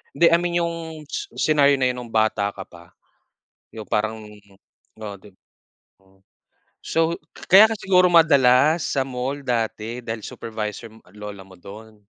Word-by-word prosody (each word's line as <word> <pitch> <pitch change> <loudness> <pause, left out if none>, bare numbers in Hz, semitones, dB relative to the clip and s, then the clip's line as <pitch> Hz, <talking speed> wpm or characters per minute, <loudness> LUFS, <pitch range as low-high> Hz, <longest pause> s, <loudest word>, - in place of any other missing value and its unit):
Hindi, 170 +3 +5
I 170 - +4
mean 175 0 -3
'yong 170 0 -2 0.3
s 415 - -4
scenario 145 -2 +3
na 130 -2 +1
yun 125 -1 -5
nung 115 - -15
bata 110 -2 +1
ka 95 - -9
pa, 85 -1 -17 0.8
'yong 110 - -7
parang 110 +1 -2 0.7
oo, 105 -2 -8
'dib 100 -1 -18 0.7
Mm. 95 0 -28 0.7
So, 165 +1 0 0.3
kaya 200 +4 +9
ka 225 - -1
siguro 190 -3 +2
madalas 155 -2 +4
sa 135 - +1
mall 130 +2 -4
dati 115 -1 -3
dahil 110 -1 -5
supervisor 110 0 -6
m 110 - -18 0.2
lola 105 -2 -8
mo 95 -1 -16
do'n. 105 +4 -13
125 Hz, 155 wpm, -22 LUFS, 105-160 Hz, 0.8 s, kaya